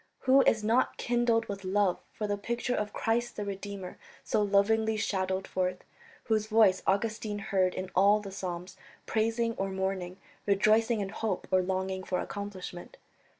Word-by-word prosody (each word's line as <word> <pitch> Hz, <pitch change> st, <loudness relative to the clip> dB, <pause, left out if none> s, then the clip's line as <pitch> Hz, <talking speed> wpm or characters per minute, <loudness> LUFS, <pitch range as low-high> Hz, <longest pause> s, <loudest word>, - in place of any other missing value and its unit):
Who 265 Hz, +1 st, +5 dB
is 220 Hz, -1 st, +3 dB
not 230 Hz, +4 st, +2 dB
kindled 240 Hz, -1 st, +1 dB
with 200 Hz, -1 st, -6 dB
love 190 Hz, -1 st, +1 dB
for 215 Hz, -, -4 dB
the 205 Hz, -1 st, 0 dB
picture 235 Hz, +4 st, -2 dB
of 210 Hz, -3 st, -2 dB
Christ 235 Hz, +1 st, -1 dB
the 205 Hz, -, -4 dB
Redeemer 195 Hz, -1 st, -6 dB, 0.2 s
so -, -, +1 dB
lovingly 215 Hz, +2 st, +2 dB
shadowed 190 Hz, -2 st, -1 dB
forth, 185 Hz, -1 st, -2 dB, 0.4 s
whose 215 Hz, -2 st, 0 dB
voice 215 Hz, -4 st, +4 dB
Augustine 210 Hz, +1 st, 0 dB
heard 195 Hz, -3 st, 0 dB
in 185 Hz, 0 st, -5 dB
all 200 Hz, +3 st, +5 dB
the 200 Hz, -2 st, -8 dB
Psalms, 180 Hz, -2 st, -6 dB, 0.3 s
praising 230 Hz, +1 st, 0 dB
or 195 Hz, 0 st, 0 dB
mourning, 190 Hz, -1 st, -3 dB, 0.3 s
rejoicing 215 Hz, +3 st, +3 dB
in 195 Hz, -, -3 dB
hope 215 Hz, -2 st, -3 dB
or 185 Hz, 0 st, +4 dB
longing 190 Hz, 0 st, -2 dB
for 185 Hz, -1 st, -1 dB
accomplishment? 190 Hz, -3 st, -7 dB
200 Hz, 155 wpm, -30 LUFS, 190-220 Hz, 0.4 s, Who